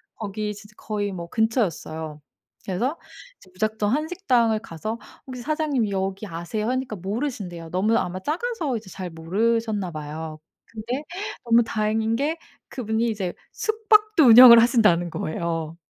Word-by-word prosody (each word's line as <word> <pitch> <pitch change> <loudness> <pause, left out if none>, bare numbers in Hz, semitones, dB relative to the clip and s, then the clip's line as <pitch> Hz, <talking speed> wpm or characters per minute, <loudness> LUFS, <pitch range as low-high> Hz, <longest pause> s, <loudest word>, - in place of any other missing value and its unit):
거기 210 0 -4
진짜 210 +1 -14
거의 205 -2 -3
뭐 170 -2 -6
근처였어요. 165 - -1 0.4
그래서 240 - -2 0.4
이제 - - -19
무작정 215 +2 -1
한식당을 270 - +1
가서 215 +3 -6 0.3
"혹시 255 -2 -7
사장님 295 -5 0
여기 195 +1 -3
아세요?" 190 +6 -3
하니까 255 -3 -2
모르신대요. 195 - -4
너무 210 +5 +2
아마 185 0 -2
작아서 320 - -2
이제 215 -3 -11
잘 185 0 -6
모르셨나 205 +4 -1
봐요. 155 +1 -6 0.3
근데 235 +6 -5 0.4
너무 235 0 +5
다행인 220 0 0
게 300 +5 -1 0.3
그분이 230 -1 -1
이제 195 -5 -3 0.2
숙박도 430 -5 +3
운영을 235 0 +10
하신다는 210 -8 +3
거예요. 165 0 -3
220 Hz, 325 characters per minute, -24 LUFS, 185-245 Hz, 0.4 s, 운영을